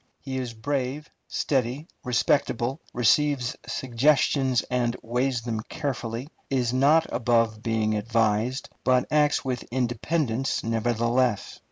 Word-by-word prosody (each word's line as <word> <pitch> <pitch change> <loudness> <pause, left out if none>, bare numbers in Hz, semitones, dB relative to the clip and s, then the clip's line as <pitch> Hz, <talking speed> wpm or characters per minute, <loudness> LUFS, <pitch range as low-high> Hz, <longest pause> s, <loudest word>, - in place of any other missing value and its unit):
He 130 -2 -4
is 120 -3 -5
brave, 140 +4 -3 0.2
steady, 135 +3 -1 0.2
respectable; 125 +2 +1
receives 125 +2 +2
suggestions 130 0 +2
and 120 -1 -1
weighs 125 +1 0
them 115 -2 -2
carefully; 130 -4 -3 0.2
is 125 -3 0
not 145 +5 +4
above 115 -2 +1
being 110 -2 0
advised, 115 +3 0
but 125 -1 +3
acts 150 -2 +3
with 125 -2 -2
independence 130 +1 -1
nevertheless. 115 0 0
125 Hz, 110 wpm, -26 LUFS, 115-135 Hz, 0.2 s, not